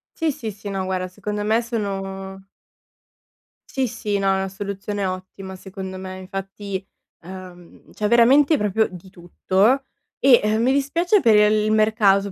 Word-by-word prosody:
Sì, 320 -2 0
sì, 225 -5 -6
sì, 205 0 -9
no 195 -1 -2
guarda, 185 -1 -2
secondo 205 +2 -5
me 220 +2 +2
sono 195 -4 -4 1.3
Sì, 265 -1 0
sì, 210 -3 -2
no, 195 0 0
è - - +2
una 190 - -2
soluzione 200 +1 -4
ottima 185 +1 -6
secondo 190 0 -8
me. 185 0 -7
Infatti, 195 +1 -6 0.4
uhm, 180 -1 -12
c'è 210 - -2
veramente 270 +7 +5
proprio 210 +1 +1
di 185 +1 -12
tutto 190 +8 +1 0.4
e, 260 -3 +6
ehm, 215 +1 +1
mi 260 - +3
dispiace 335 +9 +2
per 225 -6 +4
il 210 0 +4
mercato, 210 -2 +3
200 Hz, 150 wpm, -22 LUFS, 190-220 Hz, 1.3 s, e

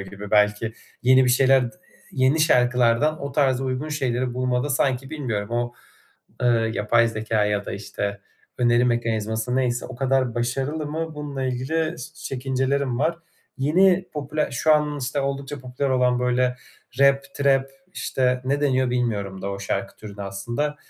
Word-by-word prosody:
gibi. 100 +1 -8
Belki 105 +1 +2 0.3
yeni 130 +1 +6
bir 125 - +3
şeyler 135 +1 +5
ııı, 120 - -3 0.4
yeni 135 +4 +2
şarkılardan 125 +1 +3
o 140 -1 -4
tarz 135 -3 +2
uygun 130 +3 -2
şeyleri 130 -4 -1
bulmada, 125 +2 0
sanki 135 0 0
bilmiyorum, 120 -10 -3
o, 120 0 -1 0.7
ııı, 115 -2 +3
yapay 115 +2 +2
zekâ 110 -1 0
ya 105 -1 -1
da - - -5
işte 100 0 -4 0.4
öneri 120 0 +3
mekanizması 115 0 -1
neyse, 125 -2 0
o 130 - -9
kadar 130 -2 +1
başarılı 135 +6 -2
mı 160 +1 -4
bununla 145 -3 -4
ilgili 130 +6 -1
s 125 - -9
çekincelerim 130 0 -1
var. 165 +3 0 0.4
Yeni, 180 +6 +3
popüler 150 +1 -2
şu 155 -1 +3
an, 150 -1 +1
işte, 130 +2 -2
oldukça 140 0 -3
popüler 130 +2 -3
olan, 125 -1 +2
böyle, 125 0 +1 0.4
rap, 140 0 +5
trap 135 -1 +2 0.2
işte, 125 -4 0
ne 140 +2 0
deniyor 130 -3 +2
bilmiyorum 105 -6 -2
da 100 - -3
o 100 - -5
şarkı 100 - -3
türüne 105 -1 -9
aslında. 120 +10 -3
125 Hz, 155 wpm, -23 LUFS, 120-140 Hz, 0.7 s, yeni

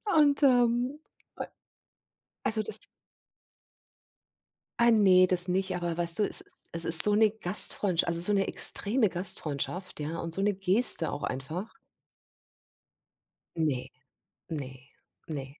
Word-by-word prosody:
Und, 290 -2 +2
ähm, 245 +2 0 0.4
ä - - -6 1.0
also 220 -1 0
das - - +3 2.0
Ah, 235 0 +3
ne, 190 -4 +3
das 180 0 0
nicht, 185 +1 -3
aber 175 -1 -5
weißt 170 +1 +4
du, 210 - +1
es - - +2
es - - -19 0.3
es 170 0 -3
ist 165 0 +10
so 210 0 +5
'ne 215 -1 +2
Gastfreundsch 195 -3 0
also 170 0 -4
so 210 - +1
'ne 195 -1 -1
extreme 215 0 +2
Gastfreundschaft, 175 -1 -3
ja, 160 +3 -6
und 165 -1 -6
so 195 - -4
'ne 205 0 -1
Geste 195 -2 0
auch 145 - -8
einfach. 155 +11 -7 1.8
Ne, 130 -5 -3 0.6
ne, 140 -5 -7 0.6
ne. 145 -4 -7
185 Hz, 130 wpm, -26 LUFS, 165-215 Hz, 2.0 s, ist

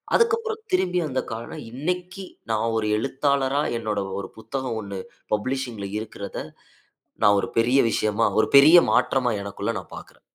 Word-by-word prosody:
அதுக்கு 465 -2 +4
அப்புறம் 450 -1 -5
திரும்பி 180 - +2
அந்த 130 -2 -1
கார்ட 115 +1 -6 0.2
இன்னைக்கு 180 +8 -4 0.3
நான் 115 +1 0
ஒரு 110 -1 0
எழுத்தாளரா 140 +2 0 0.2
என்னோட 105 -2 -2 0.2
ஒரு 95 - -6
புத்தகம் 130 0 -4
ஒண்ணு 100 -2 -6 0.3
பப்ளிஷிங் 120 0 -2
ல 100 - -3
இருக்கறத 100 -2 -7 0.9
நான் 100 0 +6
ஒரு - - -4
பெரிய 125 +4 +4
விஷயமா, 110 +1 +1
ஒரு - - +2
பெரிய 150 +5 +9 0.2
மாற்றமா, 125 -2 +2
எனக்குள்ள 100 0 -3
நான் - - -14
பார்க்கறேன். - - -15
130 Hz, 150 wpm, -24 LUFS, 110-145 Hz, 0.9 s, பெரிய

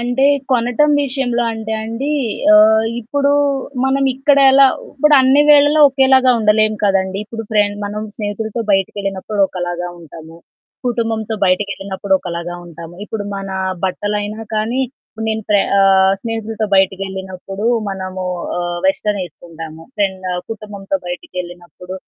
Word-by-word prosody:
అంటే 245 +3 0 0.3
కొనటం 245 +4 +2
విషయంలో 255 -3 -1
అంటే 220 0 -5
అండి, 230 +6 -3 0.4
ఆహ్, 220 +1 +6 0.2
ఇప్పుడు 280 +5 0 0.5
మనం 270 +1 +1
ఇక్కడ 275 +2 +3
ఎలా 270 +1 +7 0.3
ఇప్పుడు 300 +2 +3
అన్ని 265 +3 +5
వేళల్లో 290 +1 +6
ఒకేలాగా 265 -1 +4
ఉండలేం 215 0 +3
కదండీ! 190 -1 +1
ఇప్పుడు 225 +1 -7
ఫ్రె 210 -1 +4 0.2
మనం 210 +1 -4
స్నేహితులతో 220 +2 -4
బయటకెళ్ళినప్పుడు 195 +1 -2
ఒకలాగా 175 -1 -4
ఉంటాము, 165 0 -12 0.5
కుటుంబంతో 225 -2 -1
బయటకెళ్ళినప్పుడు 195 +1 -2
ఒకలాగా 175 -1 -5
ఉంటాము, 170 0 -10
ఇప్పుడు 210 -1 -5
మన 195 0 -6 0.4
బట్టలైనా 205 +3 -2
కానీ 220 +4 0 0.5
నేను 220 0 -2
ఫ్ర 210 - +4 0.2
ఆహ్, 190 -1 +5
స్నేహితులతో 225 -1 -3
బయటికెళ్ళినప్పుడు 190 +1 -2 0.3
మనము 185 -1 -5 0.6
వెస్టర్న్ 200 +1 0
ఏసుకుంటాము, 165 -1 -11
ఫ్రెండు 190 -3 -2 0.2
కుటుంబంతో 205 -3 -4
బయటికెళ్ళినప్పుడు 175 0 -7
210 Hz, 115 wpm, -17 LUFS, 190-230 Hz, 0.6 s, ఎలా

